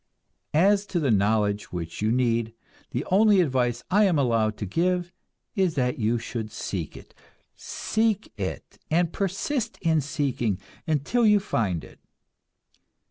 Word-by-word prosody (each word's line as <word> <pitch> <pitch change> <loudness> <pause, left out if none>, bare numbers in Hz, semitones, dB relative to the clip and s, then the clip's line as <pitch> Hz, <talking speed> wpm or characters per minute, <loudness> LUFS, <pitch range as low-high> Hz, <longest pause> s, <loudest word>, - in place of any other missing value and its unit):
As 200 +5 +4
to 180 - -1
the 140 -6 +1
knowledge 105 0 +1
which 85 0 -5
you 110 +1 +2
need, 115 -2 +1 0.3
the 125 - -3
only 205 +1 +5
advice 125 -7 +1
I 205 +3 +5
am 180 -5 +3
allowed 115 -5 +1
to 105 - -4
give 175 - 0 0.4
is 185 -5 +1
that 125 -3 0
you 115 +2 +1
should 110 -1 -5
seek 85 -6 -5
it. - - -14 0.4
Seek 220 -1 -1
it, 95 -3 -5
and 170 +1 +1
persist 215 +5 -2
in 160 -3 +2
seeking, 130 -7 -1 0.3
until 160 - +1
you 210 -2 +6
find 105 - -1
it. - - -14
140 Hz, 140 wpm, -26 LUFS, -, 0.4 s, you